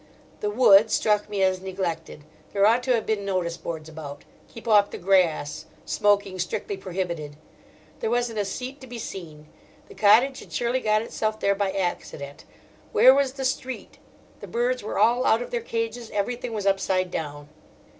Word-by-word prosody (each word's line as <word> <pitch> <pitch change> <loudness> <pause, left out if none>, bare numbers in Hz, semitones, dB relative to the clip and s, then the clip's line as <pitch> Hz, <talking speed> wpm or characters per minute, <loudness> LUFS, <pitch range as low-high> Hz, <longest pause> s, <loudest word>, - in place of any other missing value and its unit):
The 210 - -1
wood 210 -1 +6
struck 210 -1 +1
me 200 -2 0
as 185 -1 +2
neglected: 180 -5 -4 0.3
there 200 0 +4
ought 230 +3 +4
to 255 - +3
have 225 - -2
been 215 -2 -1
notice 185 -4 -1
boards 160 -2 -6
about, 150 -3 -9 0.3
"Keep 230 - -11
off 205 -2 +5
the - - -7
Grass," 170 -5 +1 0.2
"Smoking 200 -2 +1
Strictly 180 +3 -3
Prohibited": 175 -6 -4 0.6
there - - -1
wasn't 240 -2 0
a 205 - 0
seat 255 +7 -6
to 260 - -10
be 240 -1 -7
seen. 160 -8 -8 0.4
The - - -11
cottage 235 +6 +4
had - - -13
surely 240 +2 0
got 215 -2 +1
itself 215 -1 -2
there 200 - +2
by 200 -1 -1
accident: 175 -7 -4 0.5
where 260 - +7
was 275 -1 +1
the 270 -1 -4
street? 260 0 -4 0.4
The - - -9
birds 250 +2 0
were 210 - -4
all 235 +4 +4
out 235 -2 +3
of - - -10
their 240 - -1
cages; 230 0 -3
everything 240 +4 -2
was 210 -3 -3
upside 190 -2 +1
down. 145 -2 -5
205 Hz, 175 wpm, -25 LUFS, 185-235 Hz, 0.6 s, where